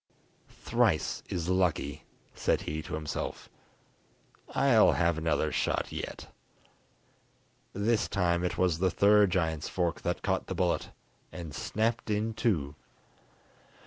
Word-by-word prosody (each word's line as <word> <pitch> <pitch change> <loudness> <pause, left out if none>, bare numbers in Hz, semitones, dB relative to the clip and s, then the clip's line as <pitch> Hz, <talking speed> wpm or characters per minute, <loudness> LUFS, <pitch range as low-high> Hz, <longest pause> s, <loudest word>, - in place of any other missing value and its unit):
"Thrice - - 0
is 85 -2 -3
lucky," 85 -6 0 0.3
said - - 0
he 75 +1 -4
to 75 - -5
himself; 75 -2 -5 1.1
"I'll 130 -6 +5
have 85 -1 +2
another 80 -1 0
shot - - -1
yet." - - -6 1.5
This 105 +2 +1
time 85 -2 +1
it 90 - -1
was 90 -3 +2
the 95 +1 +3
third 100 +2 +5
giant's 80 -4 -1
fork 85 -3 -1
that - - -2
caught - - 0
the 95 - -4
bullet, 90 -1 0 0.4
and 85 -4 -7
snapped 110 +8 -1
in 110 +2 0
two. 85 -11 0
90 Hz, 120 wpm, -30 LUFS, 80-100 Hz, 1.5 s, I'll